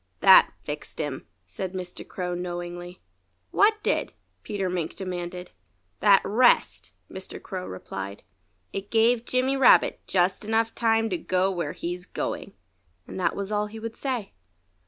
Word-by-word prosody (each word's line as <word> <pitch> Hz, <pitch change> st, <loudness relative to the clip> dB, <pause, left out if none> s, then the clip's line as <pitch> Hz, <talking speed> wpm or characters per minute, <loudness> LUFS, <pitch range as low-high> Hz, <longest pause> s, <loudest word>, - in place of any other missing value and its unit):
"That -, -, +8 dB
fixed -, -, -7 dB
him," -, -, -4 dB, 0.2 s
said 140 Hz, -, -5 dB
Mr. 180 Hz, -1 st, -7 dB
Crow 180 Hz, -1 st, -4 dB
knowingly. 175 Hz, 0 st, -6 dB, 0.5 s
"What 425 Hz, +2 st, +5 dB
did?" -, -, 0 dB, 0.3 s
Peter 195 Hz, -2 st, -3 dB
Mink 175 Hz, -3 st, -3 dB
demanded. 180 Hz, -1 st, -5 dB, 0.5 s
"That 200 Hz, -2 st, +6 dB
rest!" 245 Hz, +4 st, +3 dB, 0.2 s
Mr. 190 Hz, 0 st, -7 dB
Crow 185 Hz, -1 st, -6 dB
replied. 95 Hz, +2 st, -7 dB, 0.5 s
"It 195 Hz, +1 st, -5 dB
gave 230 Hz, +1 st, +3 dB
Jimmy 255 Hz, +2 st, +1 dB
Rabbit 270 Hz, -, +5 dB
just 185 Hz, 0 st, +2 dB
time 215 Hz, -, -6 dB
enough 225 Hz, 0 st, +2 dB
to 225 Hz, +5 st, +1 dB
go 185 Hz, -4 st, +1 dB
where 175 Hz, -2 st, -3 dB
he's 175 Hz, +1 st, -5 dB
going." -, -, -4 dB, 0.5 s
And -, -, -7 dB
that 185 Hz, -, +1 dB
was 200 Hz, +1 st, -4 dB
all 210 Hz, 0 st, 0 dB
he 215 Hz, +2 st, -10 dB
would 225 Hz, +1 st, -6 dB
say. 250 Hz, -7 st, -3 dB
190 Hz, 145 wpm, -26 LUFS, 180-225 Hz, 0.5 s, That